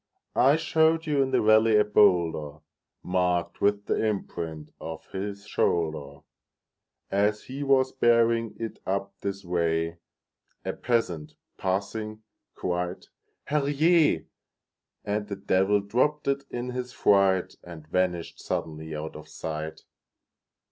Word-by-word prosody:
I 140 +3 +6
showed 160 +1 +2
you 145 -3 +2
in 135 - +1
the - - +2
valley 110 +1 +5
a 105 - +6
boulderMarked 85 -1 0
with 100 0 +2
the - - 0
imprint 85 -7 -3
of 80 -1 -7
his 100 +1 -5
shoulder; 80 -4 -1 0.9
As 105 +2 +1
he 135 +2 -7
was 135 -2 +3
bearing 115 -2 +3
it 115 -1 -5
up 100 +1 -1
this 100 -1 -4
way,A 85 -1 -4
peasant, 85 -11 -1 0.2
passing, 105 +3 -3 0.3
cried, 90 0 -3 0.4
"Herr 150 +1 0
Jé!"And 140 - -1
the 100 - -4
Devil 95 +1 +2
dropped 130 +9 0
it 140 0 0
in 125 +1 -4
his 125 0 -5
fright, 95 -2 +3
And 85 -3 -10
vanished 90 0 -1
suddenly 80 0 -4
out 75 +1 -5
of 75 0 -10
sight! 80 0 -5
100 Hz, 115 wpm, -27 LUFS, 85-115 Hz, 0.9 s, I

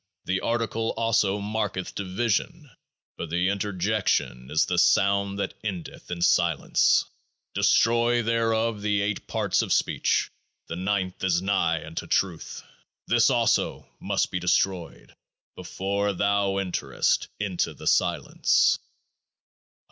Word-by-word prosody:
The 95 0 0
Article 115 -1 -1
also 105 -3 +2
marketh 105 -2 -3
Division; 120 - -2 0.5
but 85 - -5
the 90 +3 +1
Interjection 100 -9 -1
is 75 +1 +2
the - - 0
sound 100 0 +3
that 100 - -3
endeth 95 -6 -6
in 90 - -3
the 85 - -2
Silence. - - +3 0.5
Destroy 120 +1 +3
therefore 115 -1 0
the 105 -1 0
Eight 105 0 -3
Parts - - 0
of - - -4
Speech; - - +1 0.3
the 85 - -6
Ninth 95 0 -2
is 90 -1 +1
nigh 85 -5 0
unto 80 +1 -6
Truth. 90 -4 -2 0.4
This - - +4
also - - +1
must - - -1
be 90 - -2
destroyed 90 0 -1 0.4
before 100 +3 -2
thou 100 +1 +1
enterest 85 -9 0
into 95 -4 -2
The - - -11
Silence. - - +2
100 Hz, 120 wpm, -25 LUFS, 90-110 Hz, 0.5 s, This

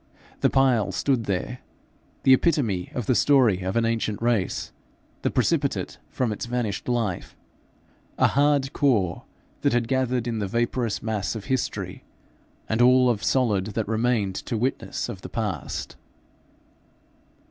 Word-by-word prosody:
The - - +3
pile 130 -5 +3
stood 130 -5 0
there, 100 +6 -2 0.6
the 130 - +7
epitome 125 - +1
of 125 - -2
the 130 - +3
story 125 -8 +4
of 95 +3 -3
an 115 -1 +2
ancient 115 -2 -1
race, 115 -5 0 0.5
the - - +1
precipitate - - 0
from 125 -4 -1
its 105 - -4
vanished 120 -3 -2
life 115 -7 -2 0.8
a - - +4
hard 140 -1 +2
core 105 - +1 0.4
that - - +2
had 120 -1 +1
gathered 130 -2 0
in 115 -2 -2
the 100 - -1
vaporous 120 +1 -1
mass 110 -2 -2
of 110 - -6
history 130 -2 -3 0.6
the 110 +2 +1
all 125 0 +6
of 110 -3 -3
solid 105 -8 +1
that 110 -2 -1
remained 110 -3 +1
to 115 +5 -4
witness 125 +5 -2
of - - -7
the - - -8
past. - - -4
115 Hz, 145 wpm, -25 LUFS, 105-130 Hz, 0.8 s, the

